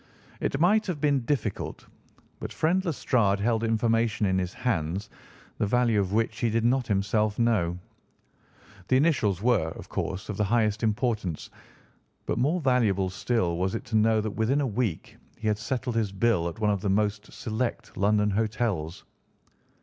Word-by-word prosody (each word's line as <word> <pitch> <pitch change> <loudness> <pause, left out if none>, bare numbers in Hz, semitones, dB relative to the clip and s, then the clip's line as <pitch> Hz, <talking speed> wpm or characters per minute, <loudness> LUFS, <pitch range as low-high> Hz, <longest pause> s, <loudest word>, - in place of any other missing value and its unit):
"It 135 - -1
might 210 +6 +3
have 175 -5 -2
been 140 -4 +1
difficult, 125 -8 -2 0.5
but - - -6
friend 180 +4 +1
Lestrade 120 - +1
held 115 +2 +1
information 115 -1 +1
in 95 -1 +2
his 90 -1 -2
hands 100 -2 -2 0.5
the 105 - +1
value 120 -1 +2
of 95 -2 -1
which 110 0 0
he 115 - +1
did 115 +1 0
not 125 +1 +2
himself 105 +1 +1
know. 105 -8 +1 1.1
The 130 - +4
initials 110 - +1
were, 115 -9 +3
of - - -10
course, 95 - -3
of 105 - -5
the 105 - +2
highest 110 0 +1
importance, 110 - -1 0.7
but - - -1
more 150 +8 +2
valuable 110 - +2
still 95 -3 0
was 95 +4 -1
it - - -5
to - - +3
know 110 0 +4
that 110 0 -3
within 115 +7 +1
a - - +1
week 110 -7 -2 0.2
he 110 - -4
had 105 -1 +1
settled 125 +1 -3
his 110 -4 0
bill 100 -4 +1
at 85 - -10
one 105 -1 +1
of 100 -2 -1
the 100 - -1
most 105 +1 0
select 115 0 -4
London 105 +1 +2
hotels." 105 -6 -1
110 Hz, 170 wpm, -27 LUFS, 100-120 Hz, 1.1 s, The